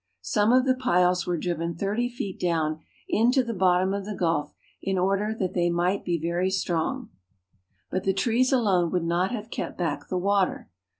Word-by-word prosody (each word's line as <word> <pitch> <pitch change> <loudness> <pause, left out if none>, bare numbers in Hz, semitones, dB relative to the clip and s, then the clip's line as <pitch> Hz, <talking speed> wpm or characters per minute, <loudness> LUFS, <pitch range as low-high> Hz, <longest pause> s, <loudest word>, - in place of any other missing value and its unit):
Some 205 - +2
of 255 +1 +4
the 260 - +4
piles 180 -9 +2
were 175 -1 0
driven 170 0 -2
thirty 210 +7 -1
feet 210 -6 -6
down 160 -3 0 0.3
into 250 +4 +3
the 235 -1 -4
bottom 185 0 +2
of 200 0 -2
the 205 +1 -5
gulf 165 -5 -1 0.3
in 195 -1 -1
order 195 +3 +1
that 185 -3 -2
they 175 -1 +1
might 175 +3 0
be 175 -2 -1
very 170 +3 0
strong. 190 +6 -2 0.8
But 185 - -1
the 195 - +2
trees 235 +5 +2
alone 195 -9 +2
would 180 -2 0
not 175 +3 +1
have 225 -1 -6
kept - - -4
back 165 -5 -2
the 185 - -2
water. 195 - 0
185 Hz, 185 wpm, -26 LUFS, 175-210 Hz, 0.8 s, of